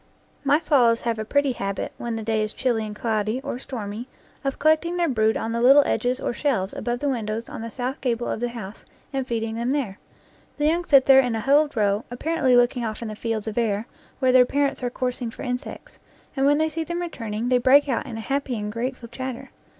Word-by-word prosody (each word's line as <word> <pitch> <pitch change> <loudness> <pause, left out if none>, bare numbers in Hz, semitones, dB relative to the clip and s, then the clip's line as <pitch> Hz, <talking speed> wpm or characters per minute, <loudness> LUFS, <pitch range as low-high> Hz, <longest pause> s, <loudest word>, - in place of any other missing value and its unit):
My 285 +2 +4
swallows 245 -8 +3
have 230 -2 -1
a 220 - -3
pretty 285 +3 +2
habit, 200 -5 -3
when 235 -1 -3
the 225 - -4
day 220 0 0
is 215 0 -2
chilly 230 -4 0
and 210 - -7
cloudy 215 +1 -1
or 250 - -5
stormy, 225 -2 -6 0.4
of 275 -1 -2
collecting 315 +3 +2
their 345 -1 +2
brood 220 -5 +2
on 225 - -3
the 235 0 -1
little 275 +4 +7
ledges 250 +2 0
or - - -2
shelves 235 -9 -1
above 240 0 -2
the 290 - 0
win 235 -5 -2
dows 220 +2 -3
on - - -7
the 230 - -5
south 255 +3 -4
gable 240 -2 -1
of - - -2
the 245 +1 -1
house 220 -4 -8 0.3
and 265 -1 -2
feeding 225 -2 -2
them 235 +3 -1
there. 240 -10 -2 0.6
The 295 - 0
young 335 +3 +2
sit 275 -4 +6
there 270 -1 +8
in 245 -3 +1
a - - -1
huddled 285 +2 +3
row, 205 0 +2
apparently 265 +1 +1
looking 245 0 +3
off 220 0 -4
in 225 - -4
the 215 - -6
fields 220 -1 -3
of 220 +1 -2
air 215 -2 0 0.3
where 260 -1 +3
their 255 0 +7
parents 280 +2 0
are 245 - -1
coursing 250 -1 -3
for - - -9
insects, 250 0 -6 0.4
and 270 0 +2
when 290 +1 +4
they 315 +1 +1
see 320 +1 -3
them 345 +2 -4
returning, 230 -8 -4
they 250 -1 +4
break 275 +4 +5
out 260 +1 -1
in 230 -3 -6
a - - -4
happy 270 0 -2
and 210 0 -4
grateful 245 +1 -4
chatter. 255 +1 -6
245 Hz, 235 wpm, -24 LUFS, 225-275 Hz, 0.6 s, there